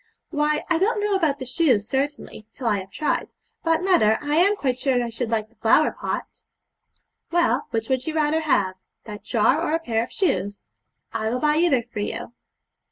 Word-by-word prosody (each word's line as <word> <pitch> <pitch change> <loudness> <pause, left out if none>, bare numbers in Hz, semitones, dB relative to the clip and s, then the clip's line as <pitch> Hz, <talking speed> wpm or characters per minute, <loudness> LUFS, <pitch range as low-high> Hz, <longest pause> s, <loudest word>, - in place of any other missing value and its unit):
'Why, 300 -1 +1
I 330 -2 +1
don't 425 +4 +1
know 415 0 0
about 320 -7 +1
the 260 - -6
shoes, 250 -6 +2
certainly, 275 -5 -3
till 260 - -8
I 210 -3 +2
have 190 0 -9
tried; 295 +9 -1 0.4
but, 330 +1 +1
mother, 220 - +4
I 295 +1 -1
am 395 +5 +4
quite 255 -9 -1
sure 265 -2 +1
that 245 - +1
I 235 - -5
should 230 0 -3
like 220 -2 -1
the 225 - -30
flower 230 +7 +4
pot.' - - -5 0.9
'Well, 345 0 +1
which 225 -1 -2
would 260 +1 -1
you 315 - -2
rather 310 0 +2
have 205 -12 +1 0.3
that 210 -2 -9
jar 235 +6 +2
or 325 -1 0
a - - 0
pair 230 -8 -1
of - - -9
shoes? 200 - -1 0.4
I 220 -1 -1
will 245 - -1
buy 300 +2 +2
either 310 -8 +3
for 225 -2 -8
you.' 205 +2 -4
270 Hz, 205 wpm, -23 LUFS, 225-320 Hz, 0.9 s, mother